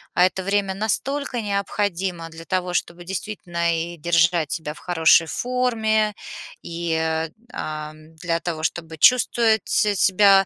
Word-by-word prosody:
а 180 - +6
это 185 +1 -1
время 200 0 0
настолько 245 +5 -1
необходимо 195 -4 -2
для 165 0 -11
того, 180 -1 -1
чтобы 175 0 -2
действительно 175 -3 -2
и 170 +1 -4
держать 170 -1 +2
себя 160 -4 -3
в - - -15
хорошей 165 -1 +4
форме, 220 -4 0 0.5
и, 170 -1 -3
э, 160 0 -1 0.2
ам, 155 +1 -7
для 165 +1 -1
того, 165 -2 -4
чтобы 160 -1 -3
чувствовать 230 +1 +4
с 210 -3 +2
себя 195 -1 +5
180 Hz, 140 wpm, -22 LUFS, 165-205 Hz, 0.5 s, а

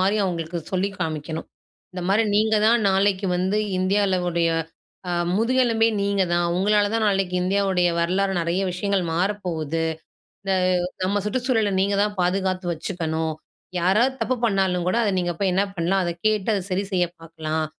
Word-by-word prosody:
மாரி, 195 +3 +2
அவங்களுக்கு 170 -1 -3
சொல்லி 185 +2 +1
காமிக்கணும். 160 -1 -3 0.5
இந்த 180 - -5
மாரி 210 +3 +4
"நீங்க 220 +1 +3
தான் 230 -1 +3
நாளைக்கு 195 0 +2
வந்து 190 +4 0 0.2
இந்தியால 190 0 +2
உடைய, 170 -1 +1 0.6
அ - - -1 0.3
முதுகெலும்பே 230 -1 +3
நீங்க 200 -1 +1
தான். 175 0 +2
உங்களால 205 +2 +2
தான் 225 -1 +1
நாளைக்கு 195 -2 0
இந்தியாவுடைய 190 -1 +2
வரலாறு, 190 +3 +1
நெறைய 170 +3 0
விஷயங்கள் 195 0 0
மாற 180 +5 +1 0.2
போகுது. 165 -1 -2 0.6
இந்த 195 -1 0 0.5
நம்ம 200 +2 0
சுற்றுச்சூழல, 225 -2 0
நீங்க 200 0 +1
தான் 210 0 -2
பாதுகாத்து 185 0 0
வச்சுக்கணும். 160 -2 -3 0.5
யாராவது 215 +9 +3
தப்பு 255 - +1
பண்ணாலும் 190 -4 +1
கூட, 205 - 0
அத 205 - +1
நீங்க 175 -1 -1
போய் 195 -2 +1
என்ன 195 +2 +2
பண்ணலாம்? 185 +2 +1
அத 170 - -1
கேட்டு 215 -1 0
அத 195 - -2
சரி 195 +2 0
செய்ய 180 -1 +2
பார்க்கலாம்". 160 -1 -3
190 Hz, 160 wpm, -23 LUFS, 175-205 Hz, 0.6 s, மாரி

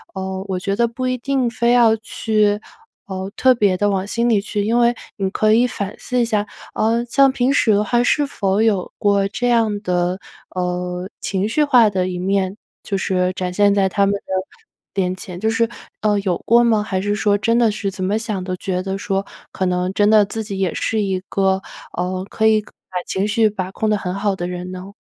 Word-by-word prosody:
呃， 190 0 -4
我 185 -1 -1
觉 195 +2 -1
得 235 +2 +2
不 255 +2 -4
一 255 0 0
定 260 0 0
非 235 +1 +1
要 235 -2 +5
去， 215 -1 0 0.5
呃， 190 0 -5
特 260 -1 +5
别 205 -5 +2
地 205 +2 +2
往 195 -1 0
心 235 +3 0
里 215 -4 +3
去。 205 0 -2
因 230 +3 +2
为 240 0 +3 0.2
你 195 -2 -1
可 215 +1 +3
以 240 +3 +4
反 205 -3 -5
思 250 -1 -1
一 - - +2
下， 210 -2 0 0.3
呃， 230 +2 +1
像 270 +3 +4
平 260 +1 +1
时 230 -6 +3
的 205 +1 +3
话 240 +3 +1
是 290 +4 +2
否 200 -6 0
有 210 -5 +1
过 200 -1 +2
这 245 +5 -2
样 225 -3 +2
的， 180 -1 0 0.4
呃， 180 0 -3
情 195 +1 -1
绪 300 +7 +2
化 250 -7 +5
的 185 -2 -1
一 180 - -4
面？ 190 +1 0 0.3
就 200 - -2
是 185 -1 0
展 180 -1 -3
现 205 +1 +4
在 195 -1 +3
他 200 +1 +2
们 200 - +1
的 200 - -6 0.8
面 180 0 -1
前， 185 -2 -8
就 220 +3 +1
是， 225 +1 +2 0.3
呃， 210 -1 +2
有 185 -3 0
过 235 +1 +5
吗？ 225 -3 +3
还 190 -3 -2
是 205 +1 0
说 205 -1 +2
真 230 +3 +1
的 230 -2 +4
是 205 -1 -3
怎 190 0 -5
么 200 +3 +1
想 215 -4 -3
都 185 0 -3
觉 180 0 -2
得 190 +1 -3
说， 195 0 -2 0.3
可 190 - -2
能 180 0 0
真 205 +1 +3
的 215 -1 +6
自 220 +2 -4
己 200 -2 -5
也 190 -3 0
是 220 -1 -1
一 190 -2 -1
个， 190 -1 +1 0.4
呃， 185 +1 -2
可 220 - +1
以 215 -1 +4
可 210 - -19 0.2
把 180 -1 -3
情 195 +2 -1
绪 220 +1 +3
把 190 -3 -4
控 215 +2 -1
得 210 - +2
很 180 -2 -4
好 200 0 0
的 175 -1 -4
人 180 0 -5
呢？ 185 +2 -8
205 Hz, 240 characters per minute, -20 LUFS, 190-225 Hz, 0.8 s, 的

